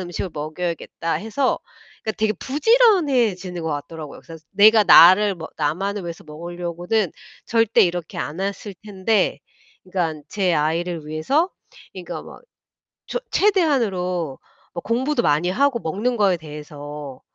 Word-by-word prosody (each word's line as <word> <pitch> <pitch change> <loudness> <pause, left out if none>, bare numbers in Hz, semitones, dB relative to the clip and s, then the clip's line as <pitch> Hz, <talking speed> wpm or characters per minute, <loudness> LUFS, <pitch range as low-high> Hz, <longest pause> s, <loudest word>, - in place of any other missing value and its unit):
음식을 175 +1 -5
먹여야겠다.' 165 +2 -4
해서 225 +5 -1 0.4
그러니까 220 - -2
되게 215 0 +2
부지런해지는 265 - +2
것 160 - -2
같더라고요. 150 +1 -6
그래서 165 -1 -11
내가 215 +2 +6
나를 195 +3 +8
뭐 160 -2 -8
나만을 190 +7 -1
위해서 170 -1 -7
먹으려고는 175 +5 -3 0.4
절대 225 -1 +3
이렇게 175 -2 -2
안 150 - -4
했을 200 0 -4
텐데 205 0 0 0.4
그러니깐 170 -5 -3
제 190 -4 0
아이를 160 +1 -1
위해서 270 - 0 0.4
그러니까 185 -2 -7
막 - - -13 0.7
저 - - -2
최대한으로 200 - +1 0.4
뭐 170 - -5
공부도 245 +3 0
많이 155 +5 +2
하고 270 +4 +1
먹는 220 +8 -2
거에 200 -4 +3
대해서 150 -3 -9
180 Hz, 325 characters per minute, -22 LUFS, 160-220 Hz, 0.7 s, 나를